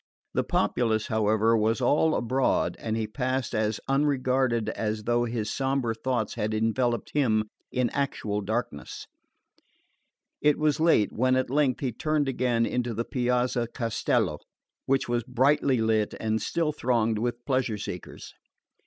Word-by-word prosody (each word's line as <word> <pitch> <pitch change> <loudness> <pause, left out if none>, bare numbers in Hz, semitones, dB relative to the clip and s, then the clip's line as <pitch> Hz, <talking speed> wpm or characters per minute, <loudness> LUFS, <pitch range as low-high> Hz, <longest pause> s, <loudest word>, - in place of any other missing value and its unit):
The - - +1
populace, 110 -3 0
however, 110 +1 +2
was 110 +2 +1
all 150 +5 +3
abroad, 130 +3 +1
and 110 0 -2
he 110 - -1
passed 130 +3 -2
as 110 -1 0
unregarded 130 -4 +1
as 105 -1 -3
though 120 +1 +1
his 115 -2 -3
sombre 135 -3 0
thoughts 115 -1 -2
had 110 +1 -2
enveloped 120 +2 0
him 110 -7 +1 0.2
in 125 -2 0
actual 110 -7 -2
darkness. 105 -7 -4 1.4
It 150 -1 +3
was 155 -1 +1
late 160 -11 +3
when 130 +2 +2
at 130 -1 0
length 140 -3 +1
he 130 -3 -1
turned 150 +4 0
again 125 -3 +1
into 120 -2 -2
the 115 - -2
Piazza 125 -1 0
Castello, 115 -1 -1 0.5
which 135 0 +1
was 120 0 0
brightly 130 +1 +2
lit 110 -1 +1
and 110 -1 -1
still 165 +4 0
thronged 115 -5 0
with 120 +1 -3
pleasure 130 -5 0
seekers. 90 -3 -7
120 Hz, 145 wpm, -27 LUFS, 110-130 Hz, 1.4 s, all